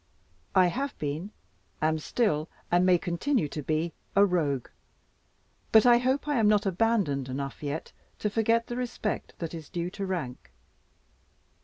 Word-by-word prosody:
I 185 Hz, -, +7 dB
have 270 Hz, +10 st, -2 dB
been, 150 Hz, +6 st, -3 dB, 0.5 s
am 155 Hz, +1 st, +1 dB
still, 155 Hz, -4 st, 0 dB, 0.2 s
and 175 Hz, +1 st, +4 dB
may 185 Hz, -1 st, +5 dB
continue 180 Hz, -, 0 dB
to 150 Hz, -, -5 dB
be, 155 Hz, +3 st, -1 dB, 0.2 s
a 200 Hz, +1 st, +7 dB
Rogue; 150 Hz, -9 st, 0 dB, 1.0 s
but 220 Hz, 0 st, +7 dB
I 240 Hz, -1 st, +7 dB
hope 260 Hz, +4 st, 0 dB
I 290 Hz, -4 st, +1 dB
am 215 Hz, -, +4 dB
not 210 Hz, 0 st, +4 dB
abandoned 190 Hz, -, +1 dB
enough 135 Hz, +1 st, -4 dB
yet 150 Hz, +2 st, -4 dB, 0.2 s
to -, -, -1 dB
forget 225 Hz, +2 st, +2 dB
the 240 Hz, -, -5 dB
respect 245 Hz, -3 st, -3 dB
that 165 Hz, -1 st, -5 dB
is 160 Hz, -3 st, -8 dB
due 175 Hz, +1 st, -3 dB
to 195 Hz, 0 st, -4 dB
rank. 160 Hz, -10 st, -4 dB
180 Hz, 155 wpm, -28 LUFS, 155-225 Hz, 1.0 s, I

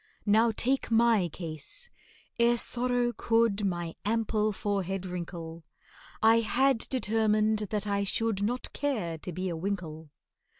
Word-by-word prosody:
Now 220 Hz, +2 st, +4 dB
take 260 Hz, +5 st, 0 dB
my 225 Hz, -5 st, +3 dB
case: 165 Hz, -, -8 dB, 0.5 s
Ere 235 Hz, 0 st, +4 dB
sorrow 245 Hz, 0 st, +1 dB
could 225 Hz, -2 st, +2 dB
My 175 Hz, -4 st, -2 dB
ample 215 Hz, 0 st, +1 dB
forehead 195 Hz, -2 st, -2 dB
wrinkle, 170 Hz, -2 st, -6 dB, 0.6 s
I 225 Hz, +1 st, +6 dB
had 250 Hz, +3 st, +2 dB
determined 220 Hz, -3 st, +2 dB
that 210 Hz, -1 st, -2 dB
I 200 Hz, -1 st, 0 dB
should 210 Hz, +1 st, -1 dB
Not 240 Hz, +5 st, -2 dB
care 210 Hz, -, -2 dB
to 180 Hz, -, -6 dB
be 185 Hz, +3 st, -3 dB
a 170 Hz, -, -2 dB
winkle. 160 Hz, -4 st, -4 dB
210 Hz, 130 wpm, -29 LUFS, 180-230 Hz, 0.6 s, I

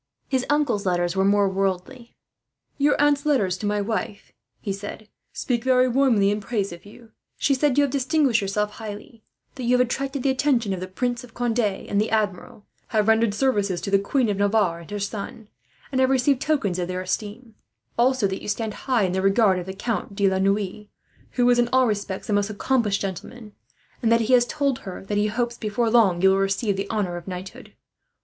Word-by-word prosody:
His 260 Hz, -2 st, -1 dB
uncle's 290 Hz, -9 st, +1 dB
letters 175 Hz, -1 st, 0 dB
were 190 Hz, -, +2 dB
more 200 Hz, 0 st, +3 dB
worldly. 195 Hz, +6 st, -3 dB, 0.6 s
"Your 285 Hz, +1 st, +3 dB
aunt's 290 Hz, -1 st, +3 dB
letters 230 Hz, -12 st, +1 dB
to 210 Hz, -, -2 dB
my 205 Hz, 0 st, 0 dB
wife," 205 Hz, -1 st, -4 dB, 0.3 s
he 200 Hz, -, -3 dB
said, 205 Hz, +2 st, -8 dB, 0.2 s
"speak 240 Hz, -3 st, -2 dB
very 255 Hz, -1 st, +4 dB
warmly 240 Hz, -6 st, +3 dB
in 210 Hz, +1 st, -2 dB
praise 200 Hz, -2 st, -2 dB
of 170 Hz, +3 st, -13 dB
you. 220 Hz, +2 st, -16 dB, 0.3 s
She 280 Hz, -, +2 dB
said 275 Hz, 0 st, +1 dB
you 290 Hz, -, +5 dB
have 280 Hz, -, 0 dB
distinguished 275 Hz, -3 st, +2 dB
yourself 210 Hz, +1 st, -1 dB
highly, 220 Hz, +1 st, -9 dB, 0.3 s
that 260 Hz, -, -9 dB
you 250 Hz, +1 st, +3 dB
have 250 Hz, -, +4 dB
attracted 270 Hz, +2 st, -3 dB
the 275 Hz, -, +3 dB
attention 255 Hz, -6 st, +1 dB
of 185 Hz, -, -4 dB
the 185 Hz, -, -5 dB
Prince 245 Hz, +6 st, -2 dB
of 240 Hz, -2 st, -15 dB
Conde 240 Hz, -1 st, -1 dB
and 205 Hz, -1 st, 0 dB
the 215 Hz, -, -1 dB
Admiral, 210 Hz, -2 st, -2 dB, 0.2 s
have 215 Hz, -2 st, +1 dB
rendered 220 Hz, -1 st, +3 dB
service 205 Hz, -8 st, +1 dB
to 200 Hz, -, -5 dB
the 195 Hz, -, +5 dB
Queen 245 Hz, +5 st, 0 dB
of 205 Hz, -2 st, -1 dB
Navarre 200 Hz, -4 st, +1 dB
and 170 Hz, -, -13 dB
her 205 Hz, -, -4 dB
son, 205 Hz, +2 st, -6 dB, 0.4 s
and 260 Hz, -1 st, +1 dB
have 260 Hz, -, +3 dB
received 265 Hz, 0 st, +2 dB
tokens 225 Hz, -, 0 dB
of 175 Hz, -, -2 dB
their 185 Hz, 0 st, -3 dB
esteem; 215 Hz, +5 st, -5 dB, 0.4 s
also 255 Hz, -1 st, +2 dB
that 190 Hz, -1 st, -2 dB
you -, -, -8 dB
stand 215 Hz, +1 st, -2 dB, 0.2 s
high 245 Hz, -5 st, +3 dB
in 185 Hz, -, 0 dB
the 190 Hz, +1 st, -1 dB
regard 195 Hz, -1 st, +3 dB
of 180 Hz, -, -7 dB
the -, -, -3 dB
Count 210 Hz, -1 st, -3 dB
de 200 Hz, 0 st, +2 dB
la 190 Hz, 0 st, +1 dB
Noue, 200 Hz, +1 st, -1 dB, 0.5 s
who 245 Hz, -1 st, +2 dB
is 245 Hz, -, +3 dB
in 240 Hz, 0 st, +2 dB
all 260 Hz, 0 st, +4 dB
respects 200 Hz, -4 st, -3 dB
a 210 Hz, -, -1 dB
most 205 Hz, 0 st, +1 dB
accomplished 215 Hz, -1 st, 0 dB
gentleman; 210 Hz, +3 st, -6 dB, 0.5 s
and 230 Hz, -2 st, +2 dB
that 230 Hz, 0 st, +4 dB
he 230 Hz, +3 st, +1 dB
has 245 Hz, -1 st, +5 dB
told 280 Hz, -3 st, -1 dB
her 190 Hz, 0 st, -8 dB
that 205 Hz, +1 st, -1 dB
he 210 Hz, -, +2 dB
hopes, 235 Hz, +2 st, -2 dB
before 220 Hz, +1 st, -1 dB
long, 195 Hz, -7 st, +3 dB
you 190 Hz, -, +6 dB
will 190 Hz, -, +2 dB
receive 195 Hz, +2 st, 0 dB
the 195 Hz, +1 st, -4 dB
honour 195 Hz, -6 st, -1 dB
of 175 Hz, -, -10 dB
knighthood. 185 Hz, 0 st, -8 dB
215 Hz, 215 wpm, -24 LUFS, 195-245 Hz, 0.6 s, you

